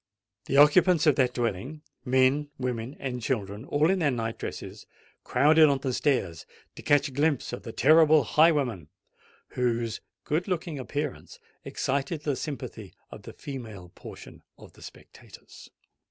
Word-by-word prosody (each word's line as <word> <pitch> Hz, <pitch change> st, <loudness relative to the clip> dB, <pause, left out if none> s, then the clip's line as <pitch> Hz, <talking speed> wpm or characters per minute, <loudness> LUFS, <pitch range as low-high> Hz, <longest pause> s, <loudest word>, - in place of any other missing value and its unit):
The 140 Hz, -, -1 dB
occupants 160 Hz, +3 st, +5 dB
of 150 Hz, -4 st, +4 dB
that 125 Hz, -2 st, +1 dB
dwelling—men, 130 Hz, +4 st, -1 dB
women, 125 Hz, 0 st, -4 dB
and 125 Hz, -2 st, -4 dB
children, 110 Hz, -2 st, -3 dB
all 150 Hz, +4 st, +2 dB
in 190 Hz, -, 0 dB
their 155 Hz, -4 st, +2 dB
night 115 Hz, -3 st, -3 dB
dresses—crowded 155 Hz, +1 st, 0 dB
on 140 Hz, -, +1 dB
the 135 Hz, -1 st, -3 dB
stairs 125 Hz, -, -1 dB, 0.3 s
to -, -, -10 dB
catch 145 Hz, 0 st, +2 dB
a -, -, -9 dB
glimpse 145 Hz, -1 st, 0 dB
of -, -, -5 dB
the 115 Hz, -, -8 dB
"terrible 155 Hz, +4 st, +5 dB
highwayman," 135 Hz, -, +2 dB, 0.6 s
whose 120 Hz, -3 st, -2 dB, 0.2 s
good 160 Hz, +6 st, -2 dB
looking 170 Hz, -5 st, -3 dB
appearance 145 Hz, +2 st, -5 dB, 0.3 s
excited 140 Hz, +3 st, -3 dB
the 145 Hz, -3 st, -1 dB
sympathy 125 Hz, -9 st, -7 dB, 0.2 s
of -, -, -10 dB
the -, -, -11 dB
female 110 Hz, -10 st, -9 dB
portion -, -, -12 dB, 0.2 s
of -, -, -15 dB
the -, -, -19 dB
spectators. -, -, -14 dB
135 Hz, 140 wpm, -27 LUFS, 120-150 Hz, 0.6 s, occupants